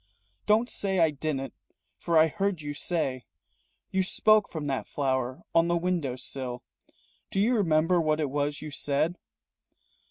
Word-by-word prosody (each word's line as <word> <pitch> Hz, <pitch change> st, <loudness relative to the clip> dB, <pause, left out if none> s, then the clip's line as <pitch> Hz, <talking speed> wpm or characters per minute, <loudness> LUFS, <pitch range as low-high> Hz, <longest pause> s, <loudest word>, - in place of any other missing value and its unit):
Don't 220 Hz, +3 st, +4 dB
say 195 Hz, -5 st, -1 dB
I 165 Hz, -3 st, +4 dB
didn't, 140 Hz, -2 st, -3 dB, 0.5 s
for 170 Hz, -1 st, +1 dB
I 155 Hz, -, +7 dB
heard 195 Hz, -1 st, -2 dB
you 145 Hz, 0 st, -4 dB
say 145 Hz, -5 st, -2 dB, 0.7 s
You 190 Hz, -, +2 dB
spoke 215 Hz, +3 st, +3 dB
from 155 Hz, -3 st, -5 dB
that 135 Hz, -2 st, -2 dB
flower 130 Hz, -2 st, -1 dB
on 165 Hz, 0 st, +4 dB
the 170 Hz, 0 st, +2 dB
window 170 Hz, -7 st, -1 dB
sill 130 Hz, -1 st, -5 dB, 0.7 s
Do 195 Hz, -, -2 dB
you 230 Hz, +5 st, +3 dB
remember 170 Hz, -3 st, +3 dB
what 155 Hz, -1 st, +1 dB
it 145 Hz, -4 st, -1 dB
was 145 Hz, +1 st, -1 dB
you 155 Hz, -, -6 dB
said?" 145 Hz, +5 st, -1 dB
155 Hz, 155 wpm, -28 LUFS, 140-180 Hz, 0.7 s, I